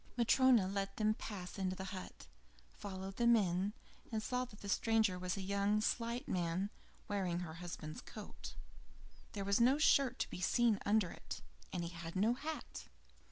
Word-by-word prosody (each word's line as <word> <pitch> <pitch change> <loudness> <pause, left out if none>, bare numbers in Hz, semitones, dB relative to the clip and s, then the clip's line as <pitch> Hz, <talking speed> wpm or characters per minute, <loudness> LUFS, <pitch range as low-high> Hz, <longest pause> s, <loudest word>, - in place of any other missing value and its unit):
Matryona 240 -3 +5
let 195 0 -2
them 215 -1 +3
pass 195 -4 -6
into 185 -1 0
the 190 - -5
hut, 185 - -8 0.5
followed 190 - -6
them 235 0 +6
in, 190 -1 +1 0.4
and 220 -1 -1
saw 250 +1 0
that 215 -4 -15
the 200 - -7
stranger 220 -2 +2
was 180 +1 -2
a 195 - -3
young, 200 +2 +2
slight 235 +4 -1
man, 180 +3 0 0.4
wearing 185 -4 0
her 160 -3 -5
husband's 165 -2 -6
coat. 65 - -9 0.8
There 200 -1 -3
was 200 +3 +3
no 260 +4 +6
shirt 275 -4 +4
to - - -1
be 180 - -5
seen 225 +2 +3
under 205 -4 +3
it, - - -7 0.3
and 175 - -2
he 170 - -3
had 170 0 -7
no 215 +5 +3
hat. 305 +5 -5
200 Hz, 170 wpm, -37 LUFS, 185-230 Hz, 0.8 s, them